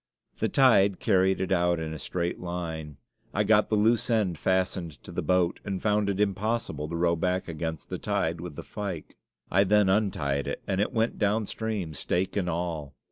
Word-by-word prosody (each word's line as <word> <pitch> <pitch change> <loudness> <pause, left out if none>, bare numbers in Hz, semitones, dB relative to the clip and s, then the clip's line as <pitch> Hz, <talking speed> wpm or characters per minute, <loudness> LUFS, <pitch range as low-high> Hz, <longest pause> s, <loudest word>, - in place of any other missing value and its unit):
The - - +1
tide 100 -8 +5
carried 95 -3 +3
it 95 0 -2
out 90 -2 +2
in 80 -1 -4
a 80 - -6
straight 85 +3 -2
line. 80 -4 -5 0.4
I 105 - +3
got 105 0 +4
the 110 - +2
loose 110 +3 +2
end 105 -7 +2
fastened 95 -3 0
to - - -9
the - - -2
boat, 90 -1 +1
and 100 -2 -3
found 105 0 +1
it 100 0 -1
impossible 105 -5 -1
to 85 - -4
row 85 0 +2
back 90 +2 -1
against 80 -1 -4
the - - -4
tide 80 +1 -1
with 85 -4 -7
the - - -7
fyke. 100 -7 -6 0.4
I 95 +2 +5
then 105 0 +4
untied 95 -9 +1
it, - - -4
and 95 0 0
it 105 - 0
went 115 -1 0
downstream, 105 -3 -1
stake 90 +5 -1
and 95 -4 0
all. 80 -4 -3
95 Hz, 190 wpm, -27 LUFS, 85-105 Hz, 0.4 s, tide